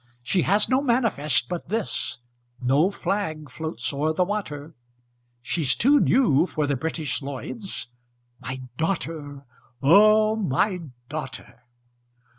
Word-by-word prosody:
She 180 +9 +2
has 205 +4 +3
no 260 +1 +2
manifest 215 - +1
but 175 +1 -5
this, 220 -1 -2 0.4
No 140 +8 +3
flag 160 -8 -3
floats 155 -4 -3
o'er 150 +3 0
the 180 - +2
water, 165 -6 -4 0.7
She's 140 +2 +1
too 285 +5 +5
new 185 - +4
for 155 -4 -1
the 140 -1 0
British 155 +1 -2
Lloyds 140 - -6 0.5
My 130 0 -6 0.2
daughter, 155 -5 -3 0.4
O 215 +7 +6
my 190 0 0 0.3
daughter! 130 -5 -7
160 Hz, 115 wpm, -25 LUFS, 140-205 Hz, 0.7 s, O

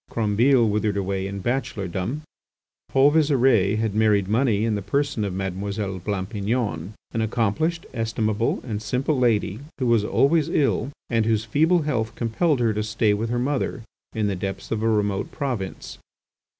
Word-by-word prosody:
Crombile 115 +3 +3
withered 105 -1 0
away 95 0 -2
in 100 -1 -6
bachelordom. 110 - -2 0.7
Paul 135 +2 +5
Visire 130 -9 +3
had 110 -2 -1
married 105 -3 +3
money 110 -1 +2
in 115 - +1
the 105 - -2
person 140 +3 -1
of 100 - -2
Mademoiselle 95 +1 -3
Blampignon, 100 0 -2 0.2
an 115 - -1
accomplished, 125 +10 0
estimable, 110 -1 -1
and 110 -4 -4
simple 125 +7 0
lady 110 -4 +1 0.2
who 130 - -1
was 115 -3 +3
always 145 +8 +2
ill, 135 -6 +1 0.2
and 115 -2 +2
whose 110 -1 +1
feeble 160 +9 +3
health 115 -7 -1
compelled 125 +6 +1
her 115 -2 +2
to 105 - -1
stay 110 0 +1
with 110 +3 -2
her 120 - 0
mother 130 -2 -1 0.3
in 110 -1 0
the 100 -1 0
depths 95 +1 -5
of 110 -1 -1
a 115 - +2
remote 105 -2 0
province. 125 -10 -4
110 Hz, 160 wpm, -24 LUFS, 100-125 Hz, 0.7 s, Paul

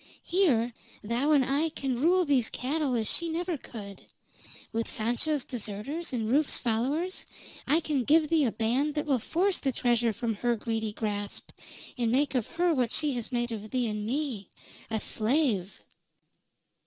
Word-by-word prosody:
Here, 265 - +2 0.3
thou 240 +8 +1
and 280 -4 +5
I 285 +5 +1
can 265 -5 -3
rule 360 +3 +4
these 265 -6 +2
cattle 275 0 -1
as 220 -2 0
she 340 -1 -1
never 340 +2 -1
could. 205 -8 -9 0.7
With 230 0 -1
Sancho's 245 +6 0
deserters, 245 +8 -3
and 230 -4 -1
Rufe's 280 +5 +3
followers, 270 +11 -1 0.4
I 310 +4 +4
can 290 -5 0
give 305 +5 +4
thee 320 -4 +3
a 235 - +1
band 250 +8 0
that 300 - -1
will 275 -4 +2
force 365 - +1
the 270 - 0
treasure 240 -2 +2
from 225 +2 -2
her 240 +2 +1
greedy 220 -1 -2
grasp, 205 -1 -4 0.5
and 230 -2 +2
make 280 +4 +2
of 250 -5 0
her 345 0 +1
what 250 -5 +1
she 300 -2 +2
has 240 -4 -4
made 240 -1 -1
of 215 -1 -5
thee 250 -1 0
and 210 -1 -3
me 245 -4 -2 0.4
a 220 -1 0
slave!" 220 - 0
250 Hz, 165 wpm, -29 LUFS, 225-300 Hz, 0.7 s, and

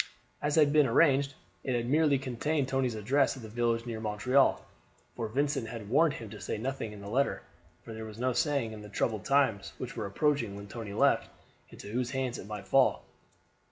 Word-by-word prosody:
As 145 0 0
had 150 -2 +5
been 150 -2 +5
arranged, 140 +2 +3 0.3
it 130 - -1
had 120 0 -1
merely 150 +1 +3
contained 135 +2 -1
Tony's 130 -3 0
address 135 +7 +1
at 125 - -10
a - - -7
village 115 +1 0
near 115 -2 -4
Montreal; 110 +6 +2 0.5
for 115 - -3
Vincent 135 0 0
had 110 -4 -7
warned 150 +4 +4
him 115 - -7
to 105 -3 -9
say - - -3
nothing 125 -1 -3
in 105 -1 -10
the 100 - -8
letter, 130 +7 0 0.4
for 115 - -7
there 110 0 -6
was 110 -1 -9
no 125 +1 0
saying, 135 -2 0
in 110 -1 -8
the 105 - -10
troubled 110 0 -1
times 135 -8 +2
which - - -6
were - - -3
approaching 120 -1 0
when 100 0 -8
Tony 105 -1 -7
left, - - +3 0.4
into - - -10
whose 125 +1 -1
hands 130 -2 -2
it 95 - -9
might 105 -1 -7
fall. - - +3
120 Hz, 205 wpm, -30 LUFS, 110-140 Hz, 0.5 s, had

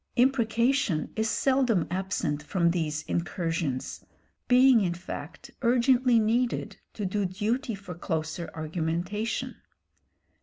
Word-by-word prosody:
Imprecation 240 - +2
is 220 0 0
seldom 255 - +2
absent 180 -6 -1
from 170 +2 +1
these 155 -3 -2
incursions, 165 -5 -2 0.4
being, 250 -1 +6
in 175 -3 0
fact, 175 - -8
urgently 250 0 +4
needed 230 +3 0 0.2
to 210 - -3
do 205 +2 -1
duty 220 +7 -1
for 195 -2 -9
closer 160 0 -3
argumentation. 170 +7 -2
200 Hz, 105 wpm, -27 LUFS, 170-240 Hz, 0.4 s, being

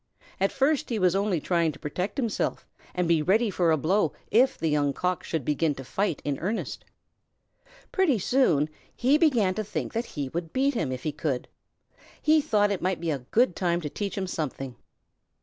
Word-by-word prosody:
At 195 +1 +2
first 280 +2 +1
he 235 - -1
was 185 -2 +3
only 195 -3 +1
trying 170 0 +1
to - - -12
protect 180 - -4
himself 235 -6 -1 0.3
and 180 -1 +1
be 165 -2 +3
ready 210 +7 +2
for 175 -2 +2
a 160 - +4
blow 185 +8 +1 0.2
if 260 +4 +4
the 165 - -1
Young 145 -2 +2
Cock 180 +2 -1
should 160 -6 -3
begin 150 0 +1
to 135 - -8
fight 190 +4 -2
in 145 -2 -1
earnest. 205 +7 -3 1.1
Pretty 360 - +3
soon 185 - +3 0.3
he 275 +5 +3
began 240 - +3
to 215 - -2
think 210 - -4
that 230 +2 -1
he 145 -9 -5
would 165 +2 -5
beat 275 +2 +2
him 165 - -1
if 130 -1 -5
he 155 - -1
could. 145 -4 -2 0.7
He 310 0 +4
thought 210 -8 +2
it 195 - -2
might 185 0 0
be 165 -1 -1
a 140 - -1
good 235 -6 +3
time 175 -2 +1
to 150 -3 -5
teach 205 -1 -4
him 195 - -1
something. 135 -7 -4
185 Hz, 200 wpm, -27 LUFS, 155-225 Hz, 1.1 s, a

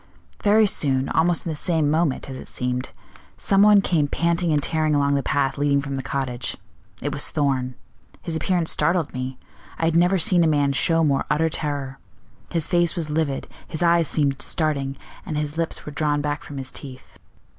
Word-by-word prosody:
"Very 215 +1 +5
soon, 135 -8 0
almost 170 +1 +1
in 165 - -2
the - - -4
same 155 -2 0
moment, 155 -3 0
as 130 -1 -7
it - - -10
seemed, 125 0 -3 0.5
some 195 0 +2
one 205 -1 +7
came 160 -7 +1
panting 170 +2 0
and 150 - +3
tearing 155 +1 0
along 140 0 +2
the 140 - +1
path 140 -1 0
leading 145 -1 +2
from 140 0 -4
the 135 - -2
cottage. 130 -3 -3 0.5
It 145 - -1
was 145 - +2
Thorn. 130 -4 -1 0.5
His 165 - -3
appearance 170 +1 +1
startled 170 -3 +1
me: 130 0 -4 0.4
I 165 - 0
had 165 0 +1
never 180 +3 +4
seen 175 0 +4
a - - +3
man 145 -2 +2
show 165 +4 +3
more 140 -3 +1
utter 160 +2 +2
terror. 140 -4 -4 0.5
His 165 -2 -1
face 175 -2 +2
was 160 -3 -3
livid, 150 -3 -1 0.2
his 160 - -2
eyes 170 -2 +4
seemed 140 -3 0
starting, 140 -4 0 0.3
and 155 - -4
his 150 0 -2
lips 165 0 -2
were 150 - -6
drawn 145 0 0
back 145 0 -2
from 145 - -9
his 130 -1 -5
teeth. 130 -2 -10
150 Hz, 195 wpm, -23 LUFS, 140-165 Hz, 0.5 s, one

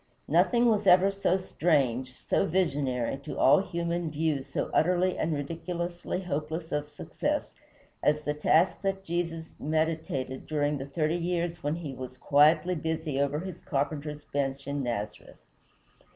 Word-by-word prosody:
Nothing 240 -1 +4
was 210 -3 +3
ever 185 +2 +6
so 195 -2 +1
strange, 135 -9 0
so - - 0
visionary, 140 -8 0
to 140 +2 -7
all - - +6
human 170 -2 -2
view 155 -2 0
so 130 - -3
utterly 180 +2 +3
and 160 - -1
ridiculously 170 +4 -3
hopeless 160 0 -3
of 150 0 -1
success, 145 - -3 0.5
as 150 0 +2
the 150 - 0
task 160 +4 +3
that 195 -1 -1
Jesus 165 -2 -3
meditated 155 -4 -2
during 145 -1 0
the 135 - -5
thirty 155 +3 0
years 175 0 -2
when 145 +2 -1
he 160 -5 -5
was 130 0 -8
quietly 155 +6 +4
busy 160 -3 -2
over 140 +2 0
his 185 -1 -7
carpenter's 150 +1 -2
bench 140 -1 -2
in 140 0 -2
Nazareth. 110 -4 -4
155 Hz, 145 wpm, -29 LUFS, 145-175 Hz, 0.5 s, ever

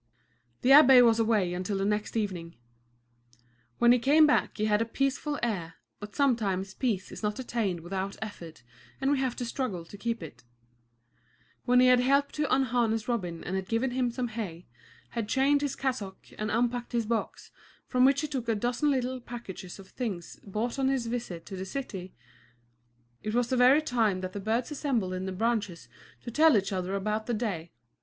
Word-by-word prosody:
The 255 - +4
abbé 265 -3 +9
was 230 -1 +4
away 215 -6 +2
until 185 +3 -2
the 195 - -1
next 210 +2 -1
evening. 180 -6 -3 1.2
When 240 0 +5
he 250 - +5
came 295 +6 +5
back 300 - +1
he 215 - 0
had 210 0 +2
a - - +1
peaceful 275 +4 -1
air, 175 -8 -2 0.2
but 210 0 -9
sometimes 200 -8 +1
peace 210 -8 -2
is - - -8
not 210 -1 -1
attained 220 -9 -2
without 190 +3 -4
effort 170 - -8 0.4
and 270 +1 +1
we 285 - +2
have 260 -2 -1
to 245 - -4
struggle 230 -8 -3
to 205 - -11
keep 230 -3 -2
it. 120 -7 -11 1.2
When 250 0 +5
he 255 - +6
had 250 0 +6
helped 275 +3 +2
to 295 -2 0
unharness 240 -4 +1
Robin 180 -9 -2
and 185 - -3
had 190 -1 -3
given 230 +4 0
him 250 -1 0
some 245 0 -3
hay, 195 -7 -6 0.4
had 230 -3 -4
changed 280 +2 +3
his 285 -2 -2
cassock 245 -8 -4
and 215 0 -3
unpacked 240 +2 -1
his 235 -2 +1
box, 230 +1 -3 0.3
from 250 -1 +2
which 275 +2 +4
he 305 - -2
took 260 -5 -4
a 225 - +2
dozen 245 +7 0
little 260 -2 0
packages 230 -7 -8
of 195 -1 -13
things 200 -9 -5
bought 220 +6 -3
on 265 - +2
his 265 -3 0
visit 230 -8 -4
to 195 - -7
the 185 - -5
city, 190 -5 -6 1.1
it 215 +1 -3
was 240 -1 +1
the 260 - +1
very 255 +5 +5
time 220 -9 +1
that 185 0 -5
the 205 - -4
birds 225 +7 -1
assembled 250 -10 -1
in 185 +1 -4
the - - -3
branches 200 - -2 0.4
to 235 - -6
tell 310 0 +5
each 195 +1 -1
other 190 0 -2
about 215 +2 -2
the 240 - 0
day. 190 -8 -3
230 Hz, 195 wpm, -28 LUFS, 195-255 Hz, 1.2 s, abbé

